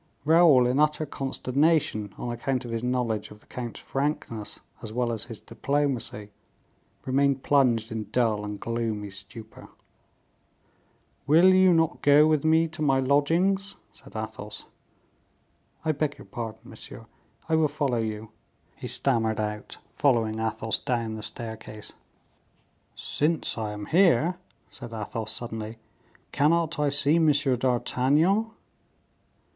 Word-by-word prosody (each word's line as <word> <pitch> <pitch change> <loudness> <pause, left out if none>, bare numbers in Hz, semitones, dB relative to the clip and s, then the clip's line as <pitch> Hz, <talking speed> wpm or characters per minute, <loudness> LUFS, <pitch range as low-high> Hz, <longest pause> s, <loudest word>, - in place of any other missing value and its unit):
Raoul, 160 -5 +6
in 125 +3 +1
utter 150 +1 +2
consternation, 135 -5 0
on 120 - -4
account 125 +2 -2
of 120 - -6
his 115 -1 -2
knowledge 120 -4 -1
of 105 - -13
the - - -23
count's 120 -2 -6
frankness 135 -6 -3 0.2
as 110 - -7
well 120 +1 0
as 110 -2 -3
his 115 -3 -9
diplomacy, 130 -7 -2 0.7
remained 135 0 +1
plunged 120 -6 +2
in 110 -2 -5
dull 110 -4 +1
and 105 -1 -5
gloomy 110 -3 -3
stupor. 105 +3 -11 1.6
"Will 170 +6 +6
you 185 0 +6
not 165 -2 +2
go 145 +1 +6
with 155 -2 +2
me 160 +1 +4
to 155 0 -8
my 135 -3 +3
lodgings?" 165 +9 +1 0.2
said - - -17
Athos. - - -6 1.2
"I 160 - +3
beg 150 0 -2
your - - -12
pardon, 110 +2 -6
monsieur; 115 -1 -11 0.4
I 160 - -1
will 160 -1 +4
follow 140 -5 -1
you," 110 -1 -4 0.4
he - - -7
stammered 115 -5 0
out, 105 0 -4 0.2
following 115 -6 +1
Athos 110 0 -1
down 115 -3 -2
the 110 - -6
staircase. 110 -1 -5 1.0
"Since 155 +2 -1
I 110 -2 -3
am 105 0 -6
here," 175 - +3 0.3
said 120 -2 -9
Athos, 110 0 -4
suddenly, 110 -1 -5 0.5
"cannot 165 +2 +2
I 145 -1 +2
see 145 +2 +3
M. 160 -2 +5
d'Artagnan?" 140 - +2
125 Hz, 130 wpm, -26 LUFS, 110-150 Hz, 1.6 s, Raoul